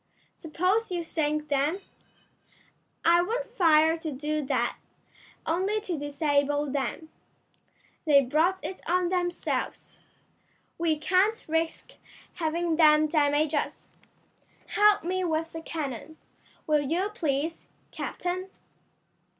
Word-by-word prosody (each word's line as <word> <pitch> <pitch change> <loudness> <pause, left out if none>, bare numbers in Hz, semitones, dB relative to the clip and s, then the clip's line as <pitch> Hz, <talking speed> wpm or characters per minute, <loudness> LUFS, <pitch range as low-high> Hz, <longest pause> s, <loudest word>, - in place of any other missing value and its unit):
"Suppose 370 +7 0
you 350 -2 -2
sink 305 -2 -1
them?" 290 +6 +1 1.3
"I 340 +1 +6
won't 465 +7 -2
fire 325 -9 +4
to 320 -1 -5
do 300 +2 -2
that; - - 0 0.7
only 380 +6 0
to 370 -5 -3
disable 290 0 0
them. 285 +3 -3 1.0
They 290 -3 +6
brought 315 +8 +2
it 375 - -6
on 360 0 +2
themselves. 355 -1 -2 0.8
We 325 -2 +1
can't 375 +8 +1
risk 325 +1 -2 0.4
having 335 0 -1
them 305 -1 +6
damage 295 0 +2
us. 295 - -3 0.8
Help 415 -2 +4
me 370 +2 -1
with 325 -1 -1
the 325 - -5
cannon, 310 -1 -5 0.5
will 300 -2 +3
you 345 +8 -1
please, 315 -2 -2 0.2
captain?" 365 +2 -4
320 Hz, 110 wpm, -27 LUFS, 300-360 Hz, 1.3 s, I